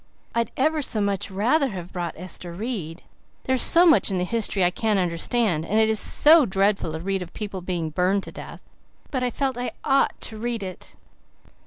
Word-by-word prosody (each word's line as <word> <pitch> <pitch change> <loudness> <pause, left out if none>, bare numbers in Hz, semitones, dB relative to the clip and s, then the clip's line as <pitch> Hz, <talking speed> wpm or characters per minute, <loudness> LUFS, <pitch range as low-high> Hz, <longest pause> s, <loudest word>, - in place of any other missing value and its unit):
I'd 235 0 -1
ever 310 +3 +1
so 230 -5 +2
much 200 -2 -1
rather 250 +9 +1
have 180 -4 -8
brought 175 -2 -4
Ester 180 0 -5
Reid. 185 -5 -5 0.4
There's 260 -2 0
so 345 +2 +6
much 320 -9 +4
in 190 - -2
the 180 - 0
history 205 -1 -1
I 175 - +3
can't 215 +1 0
understand, 180 0 0
and 205 +6 -1
it 220 0 +3
is 220 -1 +2
so 310 +1 +6
dreadful 195 -4 0
to 160 - -4
read 195 +2 -2
of 180 -1 -9
people 205 -3 -5
being 170 -3 -3
burned 185 +4 0
to - - -9
death. - - -10 0.5
But 260 - -2
I 250 - 0
felt 265 -1 -2
I 250 - -4
OUGHT 275 -1 +1
to 220 -2 -3
read 235 -2 -3
it." 185 -1 -8
200 Hz, 200 wpm, -23 LUFS, 180-240 Hz, 0.5 s, so